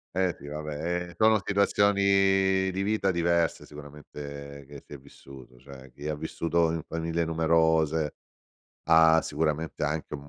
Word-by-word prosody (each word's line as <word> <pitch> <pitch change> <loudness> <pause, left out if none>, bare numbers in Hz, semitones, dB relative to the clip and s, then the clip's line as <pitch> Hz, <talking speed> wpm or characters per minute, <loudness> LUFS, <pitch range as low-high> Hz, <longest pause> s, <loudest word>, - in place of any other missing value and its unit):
Eh, 95 -2 0
sì. 70 - -11
Vabbè, 75 0 -6 0.3
ehm, 85 - -12
sono 110 0 +4
situazioni 95 -1 +2
di 95 +1 -3
vita 100 -2 0
diverse 85 -1 0
sicuramente 70 -1 -10
che 70 -1 -11
si - - -13
è - - -7
vissuto. 65 -2 -15
Cioè, 65 -1 -14
chi 75 +2 -8
ha 75 - -2
vissuto 80 +2 -1
in 80 -1 -3
famiglie 80 +1 -2
numerose 80 -1 +1 0.7
ha 80 0 +6
sicuramente 75 0 -3
anche 75 0 -3
u - - -4
mu 70 0 -14
80 Hz, 150 wpm, -27 LUFS, 75-85 Hz, 0.7 s, ha